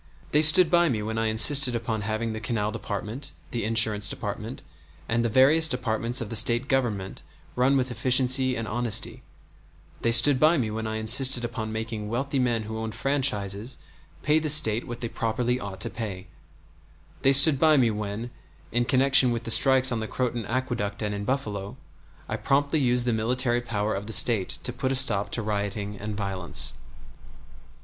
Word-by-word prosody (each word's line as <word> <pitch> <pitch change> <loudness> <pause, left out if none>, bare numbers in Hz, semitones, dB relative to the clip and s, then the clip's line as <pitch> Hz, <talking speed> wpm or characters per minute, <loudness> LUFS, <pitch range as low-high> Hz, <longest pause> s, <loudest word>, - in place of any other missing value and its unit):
They 150 - +2
stood 160 +2 +6
by 175 -1 +2
me 110 -5 -4
when 110 +1 -5
I 115 - -2
insisted 125 +4 +5
upon 110 -2 -5
having 110 +2 -5
the 110 - -7
canal 110 -1 -4
department, 115 +6 -7 0.2
the 120 - -5
insurance 110 -1 +3
department, - - -8 0.4
and 120 +1 -2
the 115 - -2
various 140 +8 +3
departments 120 -3 -2
of 115 - -8
the - - -5
State 120 +3 +2
Government 115 -8 -3 0.3
run 130 +3 0
with 130 -1 -3
efficiency 130 +1 +3
and 115 -1 -6
honesty; 120 -1 -3 0.8
they 115 - -1
stood 130 +4 +6
by 160 +3 +2
me 115 -6 -3
when 110 +1 -6
I 110 - -6
insisted 120 +3 +5
upon 110 -2 -7
making 110 -1 -7
wealthy 135 +4 -4
men 120 -3 -2
who 110 +1 -8
owned 110 -1 -7
franchises 125 -5 -1 0.5
pay 150 +2 +1
the 155 -1 -4
State 115 -6 +4
what 120 -1 -9
they 120 - -4
properly 120 +2 -4
ought 100 -5 -9
to - - 0
pay; 100 -5 -8 1.0
they 135 - +2
stood 140 +1 +8
by 155 0 +3
me 120 -4 +1
when, 105 +3 -7 0.4
in 120 +1 -1
connection 135 0 +2
with 120 -1 -4
the 115 - -3
strikes 130 +1 +5
on 115 - -3
the 110 - -6
Croton 120 -3 -5
Aqueduct 115 -5 -5
and 105 -1 -4
in 100 0 -7
Buffalo, 105 -6 -5 0.5
I - - -5
promptly 145 +3 -1
used 125 -2 0
the 120 - -1
military 120 +2 -1
power 110 -3 -4
of 100 +2 -7
the 110 - -4
State 110 -6 +2
to 125 - -2
put 130 +1 -4
a - - -2
stop 125 -6 +4
to 115 - -1
rioting 105 -1 -5
and 105 +1 -8
violence. 95 -4 0
115 Hz, 185 wpm, -23 LUFS, 110-130 Hz, 1.0 s, stood